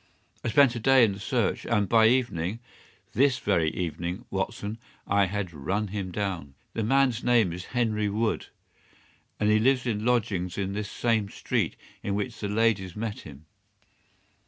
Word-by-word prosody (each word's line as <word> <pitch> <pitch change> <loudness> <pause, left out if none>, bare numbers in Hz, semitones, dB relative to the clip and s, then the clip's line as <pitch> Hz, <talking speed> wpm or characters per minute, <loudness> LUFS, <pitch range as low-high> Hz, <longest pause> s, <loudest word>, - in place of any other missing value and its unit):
I - - -2
spent 125 +2 +5
a 120 - -4
day 130 +2 +5
in 105 - 0
the 100 - -7
search, 115 0 0
and 105 -3 +1
by 110 0 +5
evening—this 120 +4 -1
very 85 -9 +1
evening, 90 +5 -4
Watson—I 100 0 -2
had 95 -2 -3
run 95 +9 -2
him 95 -2 -4
down. 90 -8 -3 0.2
The 115 - -2
man's 125 0 +2
name 115 -8 +3
is 90 +1 -7
Henry 105 -3 +1
Wood, 110 +2 -1 0.9
and 105 0 +3
he 110 - +4
lives 130 +3 +2
in 110 -3 -1
lodgings 105 -7 0
in 100 -1 -2
this 105 0 -3
same 110 -4 0
street - - -1 0.3
in 100 - -2
which 115 +3 -3
the 105 - -3
ladies 105 -4 +1
met 110 -1 -4
him. 75 0 -12
105 Hz, 160 wpm, -27 LUFS, 95-115 Hz, 0.9 s, spent